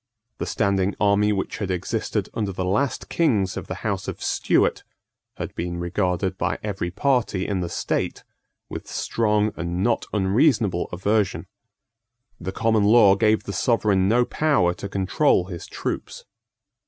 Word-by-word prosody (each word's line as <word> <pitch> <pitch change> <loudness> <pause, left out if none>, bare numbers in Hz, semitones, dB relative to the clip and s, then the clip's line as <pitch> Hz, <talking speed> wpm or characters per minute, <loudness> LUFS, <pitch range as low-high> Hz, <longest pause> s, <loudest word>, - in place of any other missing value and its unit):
The - - -3
standing 100 -1 +1
army 105 0 +3
which 95 -2 -2
had 100 -3 -3
existed 90 -2 -2
under 105 -3 -2
the 95 0 -3
last 130 +9 0
kings 105 - +1
of - - -6
the - - -4
House - - -2
of - - -5
Stuart - - +1 0.5
had - - -5
been 85 +1 -4
regarded 90 +1 -1
by - - 0
every 100 -4 -3
party 110 -2 0
in 100 -2 -1
the 85 -1 -3
state 85 - -2 0.4
with - - -7
strong 105 -2 0
and 85 +2 -2
not 120 - +1
unreasonable 105 - +2
aversion. 100 +2 0 0.9
The 95 +2 -4
common 110 0 +2
law 105 -2 +7
gave 110 +1 +2
the 100 - -5
Sovereign 105 -6 +2
no 120 +2 +4
power 140 - +2
to 100 - -7
control 100 - +2
his 90 -3 -8
troops. - - -5
100 Hz, 150 wpm, -23 LUFS, 95-110 Hz, 0.9 s, law